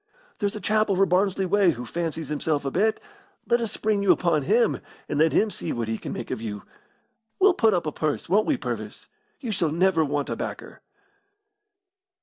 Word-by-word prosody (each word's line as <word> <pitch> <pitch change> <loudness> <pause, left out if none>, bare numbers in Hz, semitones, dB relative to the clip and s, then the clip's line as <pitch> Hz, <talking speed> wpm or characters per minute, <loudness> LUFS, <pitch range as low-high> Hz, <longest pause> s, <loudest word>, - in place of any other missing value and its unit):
"There's 205 -1 -1
a - - -4
chap 215 0 +1
over 195 0 +3
Barnsley 190 +1 +1
way 195 0 +3
who 125 -1 -7
fancies 165 +1 -4
himself 150 -1 -1
a 135 - -1
bit. 215 +7 +1 0.5
Let 235 0 +2
us 230 - -1
spring 210 -2 0
you 200 - +5
on 170 -4 +1
him, 220 - +2 0.3
and 145 - -2
let 160 +1 +4
him 215 0 +2
see 160 - -4
what 115 -2 -2
he 110 0 -2
can - - -6
make - - -6
of - - -3
you. 105 -3 -5 0.7
We'll 390 -1 +5
put 220 - +3
up 175 - -1
a 155 - -1
purse 155 0 -2
won't 205 +5 +2
we, 295 - +2
Purvis? - - -6 0.3
You 240 -5 -3
shall 180 -6 +1
never 170 0 +3
want 145 -1 -2
a - - -1
backer." - - -7
180 Hz, 200 wpm, -25 LUFS, 150-210 Hz, 0.7 s, you